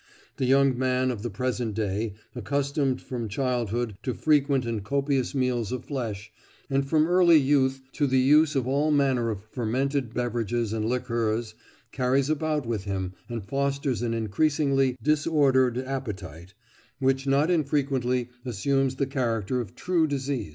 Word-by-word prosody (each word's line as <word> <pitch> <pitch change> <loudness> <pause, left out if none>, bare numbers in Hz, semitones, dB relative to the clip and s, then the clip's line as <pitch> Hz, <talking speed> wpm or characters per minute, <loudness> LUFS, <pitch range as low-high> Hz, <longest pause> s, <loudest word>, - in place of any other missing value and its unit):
The 130 - 0
young 135 0 +4
man 130 0 +1
of 115 -5 -5
the 120 - -3
present 120 0 -2
day, 105 0 -2 0.2
accustomed 140 +2 -1
from 120 -4 -4
childhood 120 -2 -1
to 125 - -3
frequent 140 -4 +2
and 115 -3 -3
copious 140 +2 0
meals 125 -5 0
of 125 -1 -4
flesh, 110 -7 -4 0.4
and 135 0 +2
from 155 0 +4
early 175 -1 +5
youth 135 -2 +2
to 145 - +1
the 130 0 +2
use 150 +4 +4
of 130 -2 0
all 140 +3 +1
manner 135 -5 +2
of 105 -3 -4
fermented 125 +3 -2
beverages 120 -2 -1
and 110 -1 -1
liqueurs, 115 -2 -1 0.4
carries 130 +2 +1
about 155 -2 -1
with 110 -4 -3
him 95 -2 -3 0.2
and 115 -4 -5
fosters 140 0 -1
an 115 -1 -1
increasingly 135 +3 +1
disordered 145 -5 +3
appetite, 100 - -6 0.4
which 135 0 0
not 140 +5 +3
infrequently 135 -6 0
assumes 135 +3 0
the 140 - 0
character 125 -3 -1
of 115 - -9
true 175 -3 +1
disease." 140 - -2
130 Hz, 150 wpm, -26 LUFS, 115-140 Hz, 0.4 s, early